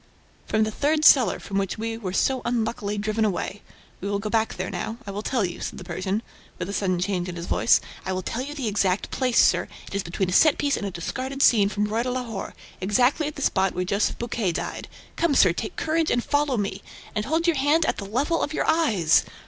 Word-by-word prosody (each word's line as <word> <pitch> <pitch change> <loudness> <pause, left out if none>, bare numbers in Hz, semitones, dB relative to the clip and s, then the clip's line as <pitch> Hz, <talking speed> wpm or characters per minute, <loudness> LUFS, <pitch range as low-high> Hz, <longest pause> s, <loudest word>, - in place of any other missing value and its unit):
"From 220 0 +2
the 215 - -1
third 305 +6 +1
cellar, 260 -5 +6
from 195 0 -2
which 195 +1 -2
we 225 +1 -3
were 205 -5 -5
so 260 +7 +1
unluckily 225 -3 -1
driven 215 +2 0
away. 205 0 -2 0.4
We 200 - -4
will 200 - 0
go 210 +1 -4
back 225 -1 +1
there 185 0 -4
now... 225 - -4
I 200 - -5
will 200 +1 -4
tell 230 -2 0
you," 175 0 -6
said - - -5
the - - -8
Persian, 190 +4 -3 0.3
with 180 - -4
a - - -4
sudden 185 -3 0
change 180 -1 -1
in 175 - -6
his 170 0 -5
voice, - - +4 0.2
"I 190 - -3
will 185 0 -2
tell 235 - -3
you 290 +3 -6
the 270 -6 -3
exact 200 -2 0
place, 255 -3 0
sir: - - +4 0.2
it - - -11
is 200 - 0
between 180 +1 -2
a - - -1
set 310 - +5
piece 285 -1 +1
and 205 - -3
a - - -2
discarded 255 +10 -3
scene 205 -4 +5
from 210 0 -1
ROI 220 +2 0
DE 250 - -2
LAHORE, 235 -6 -5 0.3
exactly 245 - +2
at 300 - -6
the 285 - -4
spot 190 -1 +1
where 180 +1 -1
Joseph 200 +3 0
Buquet 230 -6 -1
died... - - -4 0.3
Come, 330 -4 +2
sir, 185 -8 +6
take 215 - -5
courage 320 0 0
and 240 - +1
follow 290 -3 +1
me! 200 -2 -2 0.3
And 210 - -2
hold 320 +4 0
your 340 -4 +2
hand 295 +4 +3
at - - 0
the 200 - -5
level 280 - 0
of 300 - -2
your - - 0
eyes! 220 - +3
215 Hz, 245 wpm, -25 LUFS, 195-265 Hz, 0.4 s, cellar